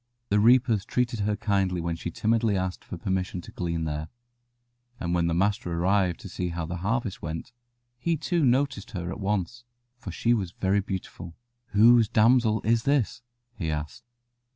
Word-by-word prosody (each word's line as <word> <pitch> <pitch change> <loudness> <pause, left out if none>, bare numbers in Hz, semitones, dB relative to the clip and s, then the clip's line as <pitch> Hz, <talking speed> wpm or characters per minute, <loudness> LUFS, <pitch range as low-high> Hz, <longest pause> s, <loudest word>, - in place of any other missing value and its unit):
The 105 - +3
reapers 115 -2 +4
treated 120 +1 -1
her 105 +1 0
kindly 100 -4 0
when 85 0 -2
she 85 - -5
timidly 110 +2 +1
asked 95 0 -3
for - - -7
permission 95 +1 -2
to - - -12
glean 85 -2 -2
there, 75 0 -3 0.9
and 85 0 -2
when 85 -1 +2
the 85 - 0
master 100 +1 0
arrived 90 +1 +1
to - - -8
see 90 -1 -3
how 85 -1 -3
the 85 +2 -4
harvest 105 +3 -2
went, 80 +9 -5 0.5
he 165 +5 0
too 170 +2 0
noticed 125 -4 +1
her 85 0 -4
at 95 - -6
once, 105 +4 -2 0.4
for 100 -6 -7
she 120 +7 +1
was 95 -6 -2
very 95 +1 +1
beautiful. 95 -3 -6 0.3
"Whose 115 +1 +5
damsel 110 -1 +3
is 115 +1 +2
this?" 140 -3 +1 0.3
he 85 -8 -4
asked. 75 +9 -5
100 Hz, 175 wpm, -27 LUFS, 90-115 Hz, 0.9 s, Whose